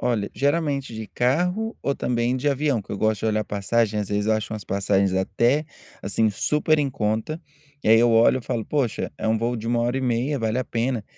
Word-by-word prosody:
Olha, 115 -5 0
geralmente, 140 -3 0
de 110 -1 -6
carro 180 - 0
ou 140 - -1
também 120 0 0
de 145 +3 0
avião, 140 -4 0
que - - -15
eu 100 - -4
gosto 110 -2 +1
de - - -1
olhar 110 -1 +1
passagem, 105 +1 0
às 100 - -4
vezes, 105 0 -1
eu 110 - +3
acho 110 0 -2
umas 110 -2 -6
passagens 100 -1 +1
até, 120 +10 +1 0.4
assim, 110 +2 +1
super 150 +7 +1
em 140 -2 0
conta, 110 +9 -2 0.4
e, - - 0
aí, 115 +1 +7
eu 120 0 +4
olho 115 +3 +5
e 125 - -9
falo: 115 -1 -3
"Poxa, 125 -5 -1
é - - -1
um 110 - +3
voo 120 +2 -1
de 110 +1 -6
1 120 0 +1
hora 120 +2 0
e - - -3
meia, 130 +3 0
vale 110 0 -1
a 130 - -1
pena.". 115 -2 -2
115 Hz, 230 wpm, -23 LUFS, 110-135 Hz, 0.4 s, aí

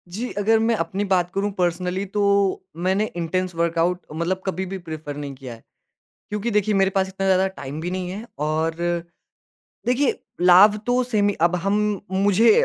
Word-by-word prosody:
जी, 245 +3 -3
अगर 220 +2 +3
मैं 225 +1 +2
अपनी 195 +2 -2
बात 180 -2 +1
करूँ 200 +1 -1
पर्सनली 180 +2 -1
तो - - +3 0.6
मैंने 190 +3 +2
इंटेंस 180 +1 -2
वर्कआउट 170 +1 +1
मतलब 175 +4 -2
कभी 190 0 -2
भी - - -3
प्रेफर 155 -2 -6
नहीं 145 -1 -5
किया 130 -2 -9
है। 115 - -15 0.7
क्योंकि 210 +3 -2
देखिए 210 0 +2
मेरे 195 0 +3
पास 190 0 +1
इतना 195 0 -4
ज़्यादा 190 0 +3
टाइम 145 -5 -7
भी 175 +2 -3
नहीं 185 -1 -3
है 205 +4 -6 0.2
और, 155 +2 0 1.1
देखिए 255 +3 +1 0.2
लाभ 185 +4 +7
तो 250 +1 +2
सेम 215 -4 +1
ही 205 - 0
अब 175 - -2
हम 200 +1 +2 0.3
मुझे 205 - +4
190 Hz, 175 wpm, -23 LUFS, 170-205 Hz, 1.1 s, लाभ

